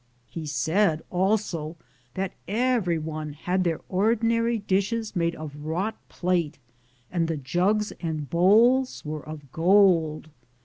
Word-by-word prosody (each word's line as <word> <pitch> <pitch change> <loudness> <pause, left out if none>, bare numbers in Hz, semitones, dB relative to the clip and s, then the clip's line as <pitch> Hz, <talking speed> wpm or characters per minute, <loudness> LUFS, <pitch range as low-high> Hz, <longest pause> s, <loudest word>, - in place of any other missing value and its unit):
He 155 +7 -7
said 160 +5 +1
also 180 -4 0 0.4
that 190 -1 -2 0.2
everyone 170 - -1
had 180 +5 -1
their 165 -3 -1
ordinary 230 +4 +1
dishes 205 +2 -1
made 170 -1 0
of 150 -2 -8
wrought 180 +8 -1 0.2
plate, 175 -4 -1 0.5
and 170 -2 0
the 165 -1 -2
jugs 185 +10 0
and 155 -4 -3
bowls 225 - +3
were 150 0 -4
of 150 -4 -10
gold. 165 -4 +3
175 Hz, 120 wpm, -26 LUFS, 155-210 Hz, 0.5 s, bowls